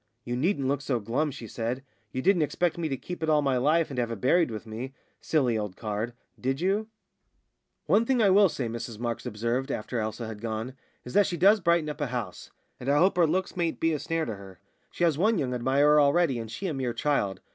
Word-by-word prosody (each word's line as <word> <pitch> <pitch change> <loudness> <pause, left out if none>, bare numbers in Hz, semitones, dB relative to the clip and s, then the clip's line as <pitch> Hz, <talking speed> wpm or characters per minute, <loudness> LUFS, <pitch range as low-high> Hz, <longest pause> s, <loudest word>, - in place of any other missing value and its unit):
"You 120 - -2
needn't 140 0 0
look 140 +1 0
so 135 -4 -1
glum," 125 +8 -1
she 125 -4 -8
said; 120 +4 -3 0.3
"you 130 - -3
didn't 195 -3 +4
expect 170 +3 0
me 165 -2 -2
to 135 - -2
keep 175 +7 -7
it 160 - 0
all 150 -1 +4
my 135 -2 +2
life, 150 +5 +2
and 130 - -3
have 120 -1 0
it 115 -3 -5
buried 165 - +3
with 110 -1 -6
me 120 +5 -6 0.2
silly 125 -8 +1
old 105 -3 -4
card 110 +2 -3 0.3
did 135 +2 -1
you?" 200 +5 0 1.0
"One 225 +2 +3
thing 260 -2 +2
I 205 -4 +5
will 200 0 +6
say," 130 -6 -3
Mrs 115 -1 -5
Marks 120 0 -3
observed, 120 +5 -2
after 120 -1 -3
Elsa 110 +2 -3
had 110 -2 -7
gone, 115 +2 -4 0.3
"is 125 - -8
that 205 -1 +5
she 175 - -3
does 200 +5 +6
brighten 170 -3 +2
up 150 0 -5
a 145 - 0
house. 115 -8 -5 0.3
And 125 - -4
I 145 - +4
hope 185 +4 +4
her 175 -2 +4
looks 185 +4 -1
mayn't 170 -2 -1
be 165 0 +2
a 150 - -1
snare 165 +1 -1
to 110 -3 -5
her. 95 -2 -12 0.3
She - - -3
has 160 -4 +2
one 215 +4 +3
young 130 -5 -1
admirer 140 +5 +4
already, 145 -2 +3
and 115 -1 -6
she 115 - -6
a 175 - -1
mere 130 -3 -2
child! 115 -7 0
135 Hz, 240 wpm, -27 LUFS, 115-165 Hz, 1.0 s, will